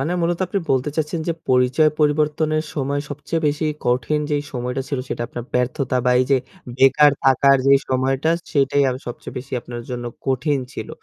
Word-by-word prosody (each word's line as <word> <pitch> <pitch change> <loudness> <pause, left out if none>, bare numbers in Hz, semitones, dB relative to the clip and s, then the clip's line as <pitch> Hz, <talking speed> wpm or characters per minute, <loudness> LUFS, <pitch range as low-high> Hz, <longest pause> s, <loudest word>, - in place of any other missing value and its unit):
মানে 155 +6 -1
মূলত 170 0 0
আপনি 200 - -1
বলতে 130 +2 +1
চাচ্ছেন 160 +1 -1
যে, - - +2 0.2
পরিচয় 130 +4 +4
পরিবর্তনের 155 +1 +1
সময় 140 0 -1
সবচেয়ে 155 +3 -4
বেশি 150 +2 0 0.2
কঠিন 125 +5 +1
যে 150 - +2 0.2
সময়টা 125 +1 -3
ছিল 140 - -2
সেটা - - -3
আপনার 120 - -6
ব্যর্থতা 125 +1 0
বা 125 - +3
এই - - +2
যে 135 - +6 0.4
বেকার 135 +2 +6
থাকার 135 +1 +5
যে 140 - +7
সময়টা 135 +4 +1 0.2
সেটাই 140 0 +2 0.2
সবচেয়ে 120 +1 -8
বেশি 135 +2 -11
আপনার 120 0 -7
জন্য 120 -1 -4 0.2
কঠিন 140 +2 +1
ছিল। 110 - -6
140 Hz, 175 wpm, -21 LUFS, 125-150 Hz, 0.4 s, যে